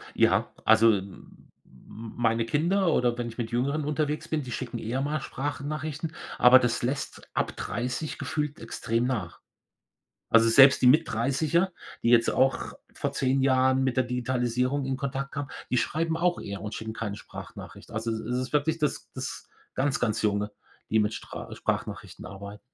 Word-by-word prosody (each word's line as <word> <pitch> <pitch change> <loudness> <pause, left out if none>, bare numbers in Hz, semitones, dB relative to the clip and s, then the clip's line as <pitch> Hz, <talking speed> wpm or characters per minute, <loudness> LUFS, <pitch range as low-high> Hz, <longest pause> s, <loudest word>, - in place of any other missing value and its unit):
Ja, - - +3
also 110 +1 +6
m 100 -1 -6 0.7
meine 115 0 0
Kinder, 170 +7 +2
oder 120 -3 +2
wenn 120 - -2
ich 115 +1 -10
mit 115 -2 -3
Jüngeren 140 +5 0
unterwegs 150 0 -1
bin, 155 -2 -1
die 125 - -7
schicken - - -4
eher 120 +4 -2
mal 150 +2 -1
Sprachnachrichten, 150 +3 -4 0.3
aber 125 +1 +9
das 120 -2 0
lässt 135 +3 -3
ab - - -1
30 125 +6 -3
gefühlt 150 -1 -3
extrem 115 +1 -1
nach. 105 -10 -3 0.9
Also, 115 0 +6
selbst 135 +4 +7
die - - +6
Mittdreißiger, 160 +4 +2 0.3
die - - +1
jetzt 115 -1 +5
auch 135 +1 +1 0.2
vor - - -2
10 135 0 +1
Jahren 130 0 +3
mit 130 -2 0
der 130 - +3
Digitalisierung 125 +2 0
in 135 0 -1
Kontakt 135 0 -3
kamen, 145 0 -4 0.2
die 125 - +2
schreiben 160 +5 0
auch 175 +1 +1
eher 100 -1 -6
und 105 0 -5
schicken 110 0 -5
keine 110 -3 -4
Sprachnachricht. - - -10
Also, 110 +1 -2
es 110 - -2
ist - - -9
es 125 +2 -1
ist 130 +2 -4
wirklich 155 +2 +1
das 150 -3 -2
das - - -6 0.3
ganz, 140 +1 +1
ganz 110 -3 0
Junge, 105 0 +1 0.4
die 110 - +2
mit 105 +1 0
stra - - -8
Sprachnachrichten - - -4
arbeiten. 100 +1 -9
130 Hz, 170 wpm, -27 LUFS, 115-145 Hz, 0.9 s, aber